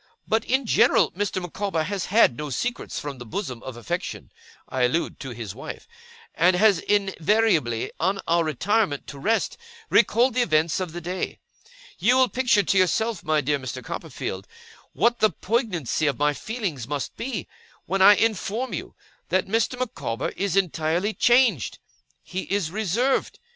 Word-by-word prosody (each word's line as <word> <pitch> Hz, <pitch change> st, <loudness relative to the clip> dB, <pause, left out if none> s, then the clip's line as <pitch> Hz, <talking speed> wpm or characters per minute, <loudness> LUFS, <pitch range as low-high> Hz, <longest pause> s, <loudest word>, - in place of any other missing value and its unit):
But, 220 Hz, +1 st, +1 dB
in 265 Hz, +1 st, +1 dB
general, -, -, +4 dB
Mr. 200 Hz, 0 st, -2 dB
Micawber 180 Hz, -1 st, -2 dB
has 195 Hz, +2 st, -3 dB
had 200 Hz, -, +4 dB
no 150 Hz, +3 st, -5 dB
secrets 240 Hz, -, -3 dB
from 140 Hz, -3 st, -6 dB
the -, -, -7 dB
bosom 125 Hz, -, -5 dB
of 130 Hz, -2 st, -8 dB
affection 120 Hz, -, -5 dB, 0.4 s
I 130 Hz, -, -3 dB
allude 160 Hz, +8 st, -1 dB
to 135 Hz, -, -6 dB
his 115 Hz, -5 st, -6 dB
wife 130 Hz, -, -8 dB, 0.5 s
and 180 Hz, +2 st, +4 dB
has 200 Hz, -1 st, +4 dB
invariably, 195 Hz, -, +1 dB
on 190 Hz, +4 st, +1 dB
our 170 Hz, 0 st, +3 dB
retirement 160 Hz, -, 0 dB
to 140 Hz, -, -9 dB
rest, 225 Hz, -, 0 dB, 0.3 s
recalled 235 Hz, +4 st, +4 dB
the 250 Hz, -, +2 dB
events 160 Hz, -6 st, +2 dB
of 180 Hz, -4 st, -4 dB
the 175 Hz, -, -6 dB
day. 180 Hz, +2 st, -4 dB, 0.6 s
'You 235 Hz, +8 st, +4 dB
will 260 Hz, -1 st, +4 dB
picture 240 Hz, -5 st, +2 dB
to 195 Hz, -, +1 dB
yourself, 210 Hz, +3 st, +1 dB
my 155 Hz, -1 st, +2 dB
dear 145 Hz, +1 st, 0 dB
Mr. 130 Hz, -3 st, -6 dB
Copperfield, 95 Hz, +1 st, -5 dB, 0.5 s
what 235 Hz, +1 st, +2 dB
the 215 Hz, -, +5 dB
poignancy 185 Hz, -, -1 dB
of 140 Hz, -4 st, 0 dB
my 150 Hz, 0 st, +2 dB
feelings 185 Hz, -, -4 dB
must 145 Hz, -1 st, -4 dB
be, 230 Hz, -8 st, -4 dB, 0.4 s
when 195 Hz, +3 st, -1 dB
I 205 Hz, +2 st, +9 dB
inform 225 Hz, +3 st, -1 dB
you -, -, -6 dB, 0.3 s
that 185 Hz, -, +2 dB
Mr. 225 Hz, +4 st, 0 dB
Micawber 235 Hz, -, -3 dB
is 195 Hz, -2 st, -2 dB
entirely 175 Hz, +2 st, 0 dB
changed. 240 Hz, -, +3 dB, 0.5 s
He 185 Hz, +1 st, -4 dB
is 195 Hz, -6 st, 0 dB
reserved. 220 Hz, +6 st, 0 dB
185 Hz, 160 wpm, -24 LUFS, 150-220 Hz, 0.6 s, I